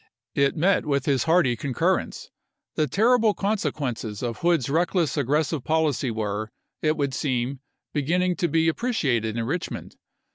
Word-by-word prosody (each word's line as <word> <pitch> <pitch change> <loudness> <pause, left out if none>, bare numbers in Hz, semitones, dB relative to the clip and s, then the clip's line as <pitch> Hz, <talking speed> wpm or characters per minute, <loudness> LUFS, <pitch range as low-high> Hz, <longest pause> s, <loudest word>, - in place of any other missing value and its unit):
It 140 +1 +2
met 180 +1 +2
with 140 -2 0
his 135 -3 +1
hearty 160 -7 +3
concurrence; 130 +1 -1 0.4
the 155 - +1
terrible 225 - +3
consequences 135 - -2
of 115 -2 -3
Hood's 170 -7 +2
reckless 170 +2 +1
aggressive 150 +1 0
policy 155 -4 +1
were, 110 -1 -3 0.3
it 155 0 +1
would 140 -3 -1
seem, 130 -1 -1 0.3
be 150 - +1
ginning 180 +5 +1
to 175 - +1
be 165 +1 +2
appreciated 135 - 0
in 115 - -1
Eichmond. 165 +8 -4
150 Hz, 145 wpm, -25 LUFS, 125-170 Hz, 0.4 s, hearty